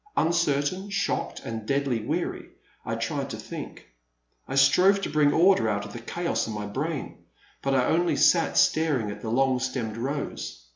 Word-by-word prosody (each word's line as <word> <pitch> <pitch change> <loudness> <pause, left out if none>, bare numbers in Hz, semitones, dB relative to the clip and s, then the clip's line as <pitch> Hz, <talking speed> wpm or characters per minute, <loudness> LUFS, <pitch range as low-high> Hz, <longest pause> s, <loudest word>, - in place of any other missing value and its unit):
Uncertain, 170 +3 +1
shocked, 195 - -2
and 110 -1 -5
deadly 135 -4 0
weary, - - -3 0.3
I - - -3
tried - - -3
to - - -5
think, - - -8 0.3
— - - -46
I 135 - -3
strove 185 +8 +5
to - - -3
bring 150 -1 +3
order 170 - +4
out 100 -1 -1
of 100 - -10
the 120 - -6
chaos 170 +7 -2
in 110 - -4
my 105 -1 -4
brain, 140 +8 -4 0.4
but 135 0 0
I 125 -2 +3
only 170 -1 +2
sat 165 +4 +3
staring 145 -10 +2
at - - -9
the 110 - -4
long 130 +2 +2
stemmed 125 -4 -3
rose. 120 - -4
135 Hz, 180 wpm, -26 LUFS, 115-160 Hz, 0.4 s, strove